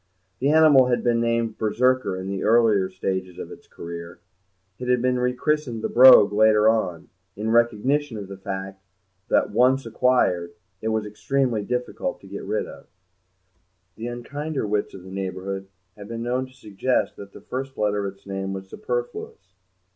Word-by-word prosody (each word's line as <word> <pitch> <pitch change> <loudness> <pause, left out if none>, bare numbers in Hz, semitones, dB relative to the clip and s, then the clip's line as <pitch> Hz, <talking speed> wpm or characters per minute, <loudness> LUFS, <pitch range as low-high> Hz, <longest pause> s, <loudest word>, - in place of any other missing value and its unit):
The 135 - +1
animal 150 -4 +6
had 120 -1 0
been 120 -1 +2
named 115 -1 -1
Berserker 120 -1 +1
in 95 0 -6
the 95 -1 -3
earlier 110 -4 +3
stages 95 -1 -4
of - - -7
its - - -13
career; 85 0 -9 0.6
it 125 - -5
had 125 0 +3
been 125 +1 +1
rechristened 125 -1 -1
the - - -1
Brogue 125 -5 +8
later 110 0 +5
on, 95 -7 0 0.3
in 110 +2 -2
recognition 120 +3 +1
of 100 -2 -7
the 100 - -8
fact 95 -1 -6 0.5
that, - - +2
once 125 +4 +3
acquired, 110 -8 +1 0.3
it 110 - -3
was 110 -1 0
extremely 120 +2 -1
difficult 125 +4 -3
to - - -14
get - - -7
rid - - -2
of. - - -12 1.1
The 115 +2 -6
unkinder 140 +4 -4
wits 105 0 -2
of 95 - -11
the 95 - -11
neighbourhood 95 0 -4 0.3
had 100 -1 -11
been 115 +1 -5
known 125 +2 -1
to - - -20
suggest 125 0 -1
that 100 0 -10
the - - -12
first 135 +1 -6
letter 105 -1 0
of 95 - -7
its 100 - -28
name 95 0 -4
was 95 0 -7
superfluous. 455 - -5
110 Hz, 170 wpm, -24 LUFS, 100-125 Hz, 1.1 s, Brogue